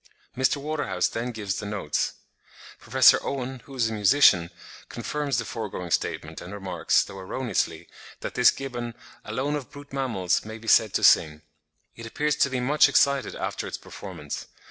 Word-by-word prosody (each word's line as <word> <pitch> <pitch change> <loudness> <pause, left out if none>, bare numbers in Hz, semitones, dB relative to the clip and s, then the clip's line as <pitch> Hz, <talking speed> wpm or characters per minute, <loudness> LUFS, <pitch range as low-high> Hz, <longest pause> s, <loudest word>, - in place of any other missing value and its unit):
Mr. 130 +3 +2
Waterhouse 150 +2 -1
then 120 +2 -3
gives 105 -3 -3
the 100 - -5
notes. 100 -8 -1 0.7
Professor - - +5
Owen, 130 -1 -4
who 135 - -11
is 120 -3 +2
a 110 - -4
musician, 105 -5 +5 0.4
confirms 145 -4 -2
the - - -1
foregoing 95 -6 -5
statement, - - -2
and 90 - -9
remarks, 95 -2 +1
though 95 - -10
erroneously, 120 +6 -2 0.3
that - - -5
this - - +6
gibbon 120 -4 -5 0.3
"alone 145 +3 -2
of 145 -3 -5
brute 145 0 -13
mammals 115 -10 0
may 110 +1 -8
be 115 0 -13
said 110 -2 +5
to - - 0
sing." 75 0 +4 0.5
It 115 0 -8
appears 150 +5 0
to 140 - +3
be 130 -1 -2
much 145 +4 +4
excited 140 -1 +2
after - - -4
its - - -5
performance. 85 -7 -8
120 Hz, 165 wpm, -26 LUFS, 100-140 Hz, 0.7 s, this